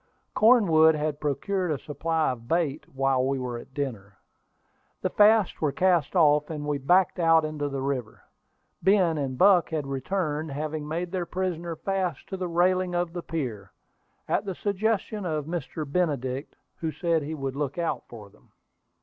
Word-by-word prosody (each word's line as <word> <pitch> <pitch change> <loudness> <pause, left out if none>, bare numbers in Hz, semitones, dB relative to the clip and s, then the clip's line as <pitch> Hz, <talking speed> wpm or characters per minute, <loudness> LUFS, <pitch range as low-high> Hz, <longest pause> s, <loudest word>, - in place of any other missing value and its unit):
Cornwood 170 -9 +5
had 150 -1 -2
procured 180 +6 -1
a 150 - 0
supply 160 +1 -1
of 115 -2 -8
bait 155 -1 -1
while 135 -1 +1
we 135 +1 0
were 125 -2 -4
at 120 - -13
dinner. 110 -9 -5 0.9
The - - 0
fasts 210 -1 +4
were 150 -3 +2
cast 180 -1 +1
off, 150 -3 +4
and 150 -2 -5
we 145 -1 -1
backed 180 +6 +3
out 165 -2 +4
into 150 -2 -3
the 135 -1 -4
river. 130 -5 -3 0.6
Ben 180 -4 +3
and 130 -2 -3
Buck 185 0 +5
had 155 -3 -2
returned, 150 +3 -2
having 150 +1 -4
made 170 +3 -3
their 180 -2 -2
prisoner 175 -2 -3
fast 185 -3 -2
to 190 - -4
the 185 -1 -3
railing 180 +1 +1
of 175 -1 -1
the 175 - -4
pier, 120 - -5 0.5
at - - +1
the 195 -3 -4
suggestion 210 +1 -1
of 155 -4 -2
Mr. 160 -1 -4
Benedict, 140 -4 -2 0.2
who 160 -1 -3
said 165 -1 0
he 155 +2 -4
would 135 -2 -4
look 145 0 -3
out 170 -1 -2
for 105 -4 -11
him. - - -26
160 Hz, 170 wpm, -26 LUFS, 140-180 Hz, 0.9 s, Cornwood